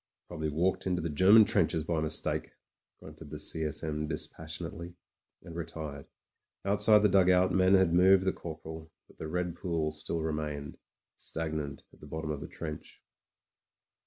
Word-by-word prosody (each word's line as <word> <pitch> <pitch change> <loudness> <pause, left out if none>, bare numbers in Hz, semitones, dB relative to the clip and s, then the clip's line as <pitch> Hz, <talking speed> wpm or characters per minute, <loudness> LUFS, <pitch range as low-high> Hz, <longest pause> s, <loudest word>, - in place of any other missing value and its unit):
"Probably 80 -3 -3
walked 90 +6 0
into 90 -1 +1
the 85 - -2
German 100 +8 +7
trenches 80 -6 +1
by 80 0 -1
mis 80 -1 +2
take/' - - -3 0.5
gnmted 75 0 -11
the 75 - -6
C. 80 +1 -2
S. 75 - -3
M. 75 -1 -2
dispassionately, 80 +2 -6 0.5
and 85 - -10
re 85 - -2
tired. 75 -3 -7 0.6
Outside 105 +1 +4
the - - +7
dugout 90 -1 +4
men 95 0 +4
had 95 -3 +4
moved 95 +2 +5
the 95 - +2
cor 80 -2 -7
poral; 80 0 -9 0.2
but - - -22
the 80 - -5
red 90 +1 -2
pools 80 -4 -2
still 80 +1 -2
remained 75 -2 -4 0.2
— - - -62
stagnant 80 -4 -4
at - - -19
the - - -12
bottom 80 -1 -4
of 75 - -4
the - - -6
trench. 75 -2 -8
80 Hz, 175 wpm, -30 LUFS, 75-90 Hz, 0.6 s, German